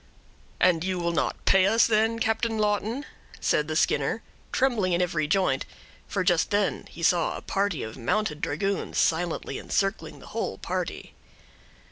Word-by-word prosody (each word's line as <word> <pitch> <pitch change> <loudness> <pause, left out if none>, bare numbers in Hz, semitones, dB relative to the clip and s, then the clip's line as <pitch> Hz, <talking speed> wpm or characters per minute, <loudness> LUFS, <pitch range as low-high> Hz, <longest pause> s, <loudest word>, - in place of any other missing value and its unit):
"And 175 -3 +4
you 185 0 -1
will 170 -1 0
not 170 - -2
pay 190 0 +5
us, 225 +3 +5
then, 225 +1 +2
Captain 225 0 0
Lawton?" 215 +6 0 0.3
said 150 - +1
the 155 - -3
Skinner, - - +1 0.3
trembling 230 -9 +1
in 170 - +2
every 165 -4 0
joint, 160 -5 +2 0.4
for 195 - -1
just 175 -2 +2
then 205 -2 0
he 170 - -9
saw 175 -1 +2
a - - -8
party 195 -6 -1
of 110 +2 -7
mounted 150 - -1
dragoons 195 +7 -2
silently 170 +1 0
encircling 195 +1 -1
the - - -14
whole - - -2
party. - - -4
185 Hz, 155 wpm, -26 LUFS, 165-215 Hz, 0.4 s, pay